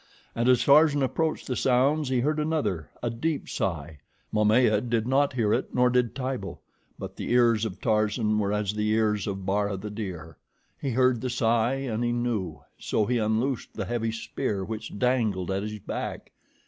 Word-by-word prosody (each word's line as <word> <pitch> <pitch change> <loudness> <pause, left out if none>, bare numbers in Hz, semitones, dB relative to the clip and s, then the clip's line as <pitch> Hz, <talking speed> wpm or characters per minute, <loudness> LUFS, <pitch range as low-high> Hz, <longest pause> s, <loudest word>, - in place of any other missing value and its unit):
And 120 +2 +1
as 125 -2 +4
Tarzan 145 0 +5
approached 160 +4 -1
the 125 - -2
sounds, 135 +4 +2
he 130 -2 +1
heard 150 +4 0
another, 115 - -1
a 120 - 0
deep 145 +6 -2
sigh. 80 -5 -3 0.3
Momaya 105 0 +4
did 115 -2 -1
not 140 +2 +2
hear 110 -4 +1
it, - - -2
nor 125 0 +4
did 125 -2 +1
Tibo; 130 -8 -4 0.4
but - - -7
the - - -4
ears 120 -2 +4
of 105 -3 -5
Tarzan 110 -1 +1
were 100 -1 0
as 105 -1 -1
the 105 0 -1
ears 110 -2 +1
of 95 -2 -4
Bara, 100 0 0
the 105 +2 -6
deer. 90 -7 -6 0.4
He 140 - -1
heard 125 -1 +2
the 130 - -2
sigh, 120 0 +1
and 120 -4 -2
he 120 - +1
knew, 120 -6 -2 0.2
so 105 - 0
he 120 +2 0
unloosed 110 +4 -1
the - - -3
heavy 115 -1 -1
spear 110 -3 -3
which 110 -1 -6
dangled 110 -7 0
at 95 +1 -1
his 105 +1 -5
back. 105 - -6
115 Hz, 185 wpm, -26 LUFS, 105-125 Hz, 0.4 s, Tarzan